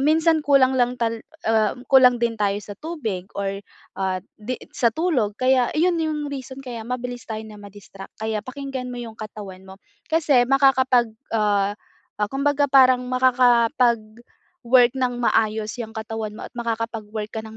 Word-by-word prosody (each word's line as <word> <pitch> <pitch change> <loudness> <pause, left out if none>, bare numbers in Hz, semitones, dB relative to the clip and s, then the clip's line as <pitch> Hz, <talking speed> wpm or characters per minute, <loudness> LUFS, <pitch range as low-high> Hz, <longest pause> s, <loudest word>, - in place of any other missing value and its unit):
minsan 315 +2 +3
kulang 265 -2 +4
lang 245 0 +2
tal 230 -1 -2 0.2
ah, 220 -1 +2 0.2
kulang 250 -2 +7
din 230 -1 0
tayo 200 -1 +1
sa 205 - -8
tubig 225 - -5
or, 195 0 -3 0.4
at 185 -1 -1 0.2
'di 250 +4 -4 0.2
sa 235 - +2
tulog. 265 - 0
Kaya, 255 -1 +3
ayun 340 +1 +2
'yong 300 -2 -2
reason 265 0 -7
kaya 235 -3 -7
mabilis 245 -1 -5
tayo 220 0 -4
na 210 -1 -12
ma-distract 200 -1 -12
kaya 220 0 -2
pakinggan 265 0 -6
mo 245 - -6
'yong 230 -2 -8
katawan 200 -3 -9
mo. 190 - -10 0.3
Kasi 295 -7 +3
makakapag, 260 -4 +3 0.2
ah, 205 -2 +1 0.4
ah, 210 -1 -1
kumbaga 285 +1 +1
parang 255 -2 +5
makakapag-work 240 -1 +2
ng 250 -1 0
maayos 220 -1 +1
'yang 220 -1 -6
katawan 220 -1 -5
mo - - -8
at - - -15
makakapag-work 225 -2 -4
ka 220 - -3
ng 220 0 -11
240 Hz, 155 wpm, -22 LUFS, 215-260 Hz, 0.4 s, kulang